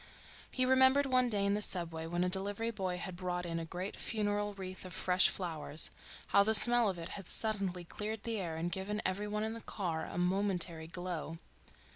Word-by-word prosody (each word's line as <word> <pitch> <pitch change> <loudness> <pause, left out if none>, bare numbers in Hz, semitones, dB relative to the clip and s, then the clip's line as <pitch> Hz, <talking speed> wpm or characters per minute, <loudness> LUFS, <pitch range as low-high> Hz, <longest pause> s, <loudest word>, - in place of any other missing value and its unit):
He 255 - 0
remembered 260 +2 +5
one 255 -2 +2
day 205 -3 0
in 200 - +2
the 210 - -1
subway 165 -5 -1
when 175 +1 -1
a - - +1
delivery 205 +5 0
boy 185 -4 -3
had 185 0 -5
brought 180 0 -3
in 165 -1 -3
a 165 - -5
great 180 +4 -6
funeral 205 -1 -1
wreath 185 -1 -7
of 185 -2 -7
fresh 185 0 +4
flowers, 160 -4 -3 0.4
how - - +5
the 220 +2 +5
smell 240 0 +8
of 185 - -4
it 165 +1 -7
had 195 -3 -6
suddenly 195 -5 0
cleared 210 +4 -5
the 225 -2 -3
air 165 -4 -4
and 170 +2 -3
given 200 +4 -3
every 195 +3 -1
one 210 +1 -2
in 220 0 -3
the 230 - -8
car 170 -8 -4
a - - -7
momentary 180 -3 0
glow. 170 -2 -5
190 Hz, 205 wpm, -33 LUFS, 175-210 Hz, 0.4 s, smell